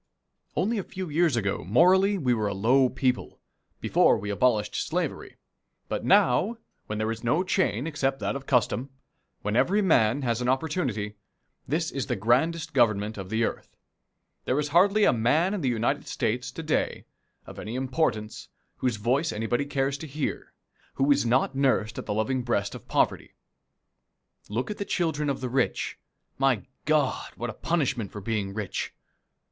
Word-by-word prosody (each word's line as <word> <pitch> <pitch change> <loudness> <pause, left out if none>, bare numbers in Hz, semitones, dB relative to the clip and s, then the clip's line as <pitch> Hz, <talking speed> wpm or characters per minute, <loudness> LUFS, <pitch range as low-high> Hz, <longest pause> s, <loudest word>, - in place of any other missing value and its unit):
Only 215 +4 +1
a - - -3
few 185 -1 -6
years 160 -2 +2
ago 100 -8 -1
morally 185 - +4
we 130 -8 +1
were 110 -3 0
a 100 - -2
low 125 +6 +4
people 130 -1 -1 0.4
before - - +4
we 105 +1 -4
abolished 105 -1 +1
slavery - - -3 0.5
but - - -2
now, 200 - +3 0.3
when 105 - -3
there 110 +1 -1
is 115 +1 -6
no 150 +10 +2
chain 180 - 0
except 135 -4 -1
that - - -2
of 135 -1 -7
custom, 125 +1 +1 0.5
when 105 +1 -1
every 190 - +3
man 140 - +3
has 120 -1 0
an 125 - 0
opportunity, 130 - -1 0.5
this 160 +4 -1
is 135 -6 -3
the - - 0
grandest 135 - +1
Government 110 -4 +2
of 95 -2 -7
the 110 +2 +1
earth. - - -4 0.7
There 130 - +1
is 150 0 0
hardly 200 +7 +4
a - - +5
man 150 - +2
in 205 - -2
the 135 - +1
United 115 -1 -1
States 125 +3 -2
to 165 - -6
day, 155 - -1 0.4
of - - -10
any 110 +3 -5
importance, 130 -5 -1 0.3
whose 125 -3 0
voice 130 +9 0
anybody 115 +5 -1
cares 140 -1 -1
to 160 - -7
hear, 145 +1 -4 0.4
who 135 - 0
was 140 -3 +3
not 130 +3 +2
nursed 130 -5 +1
at - - -8
the 105 - -1
loving 130 +4 0
breast 100 -5 -1
of - - -10
poverty. - - 0 1.1
Look 115 - -2
at 210 - -6
the - - 0
children 160 -6 -1
of 140 - -2
the 130 - -2
rich. 130 0 -1 0.4
My 135 -6 +2 0.2
God, 150 -4 +1
what 120 -1 -4
a - - -11
punishment 135 - -1
for 105 - -7
being 100 -2 -3
rich! 105 -3 -4
130 Hz, 175 wpm, -27 LUFS, 110-155 Hz, 1.1 s, a